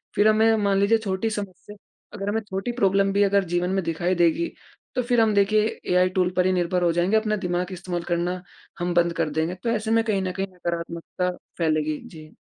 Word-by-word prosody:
फ़िर 205 Hz, -, +4 dB
हमें 220 Hz, +1 st, +4 dB
मान 200 Hz, -2 st, +1 dB
लीजिए 200 Hz, +3 st, +4 dB
छोटी 200 Hz, 0 st, -2 dB
समस्या, 205 Hz, -1 st, -7 dB, 0.4 s
अगर 200 Hz, -1 st, -4 dB
हमें 220 Hz, +2 st, 0 dB
छोटी 195 Hz, +5 st, -2 dB
प्रॉब्लम 195 Hz, -4 st, +2 dB
भी 205 Hz, +1 st, +4 dB
अगर 200 Hz, 0 st, +3 dB
जीवन 175 Hz, +1 st, +1 dB
में 190 Hz, -1 st, 0 dB
दिखाई 175 Hz, +3 st, -1 dB
देगी। 175 Hz, -, +2 dB, 0.4 s
तो 255 Hz, -, +2 dB
फिर 240 Hz, -1 st, +2 dB
हम 220 Hz, -1 st, +3 dB
देखिए 210 Hz, +2 st, +2 dB
एआई 180 Hz, 0 st, +4 dB
टूल 185 Hz, -1 st, +1 dB
पर 180 Hz, -, +3 dB
ही 185 Hz, -, +3 dB
निर्भर 180 Hz, 0 st, 0 dB
हो 170 Hz, -, +3 dB
जाएँगे, 175 Hz, +5 st, +2 dB
अपना 215 Hz, -1 st, 0 dB
दिमाग 180 Hz, -1 st, -2 dB
इस्तेमाल 175 Hz, -1 st, -4 dB
करना 175 Hz, +1 st, -1 dB, 0.4 s
हम 175 Hz, 0 st, -1 dB
बंद 170 Hz, 0 st, +2 dB
कर 165 Hz, -2 st, -1 dB
देंगे, 160 Hz, +4 st, -1 dB
तो 185 Hz, +6 st, -4 dB
ऐसे 220 Hz, -1 st, -1 dB
में 225 Hz, 0 st, +4 dB
कहीं 210 Hz, -4 st, 0 dB
न 185 Hz, -, -2 dB
कहीं 195 Hz, +2 st, -3 dB
नकारात्मकता 170 Hz, 0 st, -3 dB, 0.3 s
फैलेगी। 155 Hz, -2 st, 0 dB
जी। 155 Hz, -2 st, -13 dB
185 Hz, 210 wpm, -24 LUFS, 175-210 Hz, 0.4 s, फ़िर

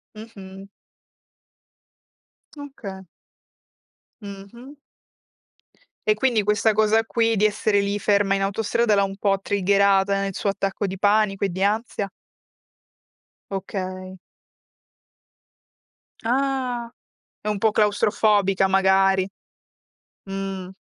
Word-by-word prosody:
Mh-mh. 195 Hz, -3 st, -11 dB, 1.9 s
Okay 220 Hz, -10 st, -8 dB, 1.2 s
Mh-mh. 205 Hz, +7 st, -11 dB, 1.3 s
E 430 Hz, -, +5 dB
quindi 240 Hz, -6 st, +1 dB
questa 210 Hz, +1 st, +2 dB
cosa 220 Hz, +1 st, +3 dB
qui, 230 Hz, 0 st, +1 dB
di 210 Hz, +1 st, +2 dB
essere 210 Hz, -1 st, +1 dB
lì 200 Hz, +1 st, -2 dB
ferma 200 Hz, -1 st, +2 dB
in 195 Hz, -, 0 dB
autostrada, 210 Hz, +2 st, +1 dB
l'ha 200 Hz, -, +3 dB
un 195 Hz, 0 st, -4 dB
po' 195 Hz, -1 st, +1 dB
triggerata 200 Hz, 0 st, +2 dB
nel 195 Hz, 0 st, -3 dB
suo 200 Hz, -, -2 dB
attacco 195 Hz, 0 st, -2 dB
di 190 Hz, -, -5 dB
panico 205 Hz, 0 st, +2 dB
e -, -, -1 dB
di 185 Hz, +2 st, -3 dB
ansia? 205 Hz, -1 st, -1 dB, 1.4 s
Okay. 185 Hz, -1 st, -5 dB, 2.1 s
Ah. 250 Hz, -1 st, -1 dB, 0.5 s
È 210 Hz, -, -5 dB
un 210 Hz, -, -1 dB
po' 220 Hz, +2 st, +2 dB
claustrofobica 205 Hz, -2 st, +2 dB
magari. 190 Hz, 0 st, +3 dB, 1.0 s
Mh. 195 Hz, -1 st, -5 dB
200 Hz, 100 wpm, -23 LUFS, 195-215 Hz, 2.1 s, E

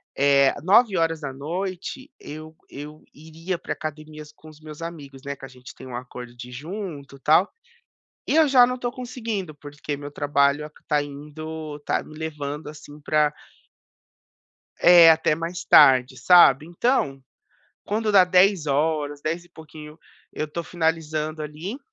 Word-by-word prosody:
eh, 140 Hz, -1 st, +4 dB
21h 180 Hz, -, 0 dB
eu 155 Hz, +1 st, -10 dB
eu 150 Hz, +2 st, -10 dB
iria 160 Hz, +4 st, -6 dB
para -, -, -5 dB
academias 155 Hz, 0 st, -8 dB
com 155 Hz, +1 st, -16 dB
os 155 Hz, 0 st, -16 dB
meus 155 Hz, 0 st, -11 dB
amigos, 145 Hz, -5 st, -9 dB
né, 140 Hz, 0 st, -4 dB
que 135 Hz, -, -11 dB
a -, -, -9 dB
gente 130 Hz, 0 st, -14 dB
tem 130 Hz, -, -12 dB
um 120 Hz, -, -7 dB
acordo 125 Hz, -1 st, -9 dB
de 120 Hz, +1 st, -10 dB
ir -, -, -12 dB
junto 150 Hz, -1 st, -7 dB
e -, -, -16 dB
tal, 160 Hz, +7 st, +3 dB, 0.8 s
e -, -, +1 dB
eu 320 Hz, -1 st, +6 dB
já 250 Hz, -2 st, +6 dB
não 250 Hz, -, -2 dB
estou 245 Hz, -1 st, -4 dB
conseguindo, 230 Hz, -9 st, -5 dB
porque 145 Hz, 0 st, -7 dB
meu 145 Hz, 0 st, -8 dB
trabalho 145 Hz, 0 st, +1 dB
aq 150 Hz, -, -16 dB
tá 150 Hz, -1 st, +1 dB
indo 150 Hz, +2 st, -8 dB
está 145 Hz, -, -2 dB
me 155 Hz, -, -14 dB
levando 150 Hz, -2 st, -5 dB
assim 150 Hz, 0 st, -12 dB
pra 150 Hz, 0 st, +1 dB, 1.5 s
É, 175 Hz, -2 st, +8 dB
até 160 Hz, -1 st, +3 dB
mais 165 Hz, +2 st, -5 dB
tarde, 130 Hz, -1 st, +6 dB
sabe. 175 Hz, -5 st, +6 dB
Então, 170 Hz, -, -1 dB, 0.6 s
quando 215 Hz, +1 st, -1 dB
dá 190 Hz, -2 st, +7 dB
22h, 155 Hz, -5 st, +1 dB
dez 170 Hz, +3 st, -3 dB
e -, -, -23 dB
pouquinho, 155 Hz, -1 st, -13 dB, 0.3 s
eu 155 Hz, -, -3 dB
estou 170 Hz, +3 st, -6 dB
finalizando 160 Hz, -2 st, -2 dB
ali 160 Hz, -, -7 dB
155 Hz, 155 wpm, -23 LUFS, 145-175 Hz, 1.5 s, É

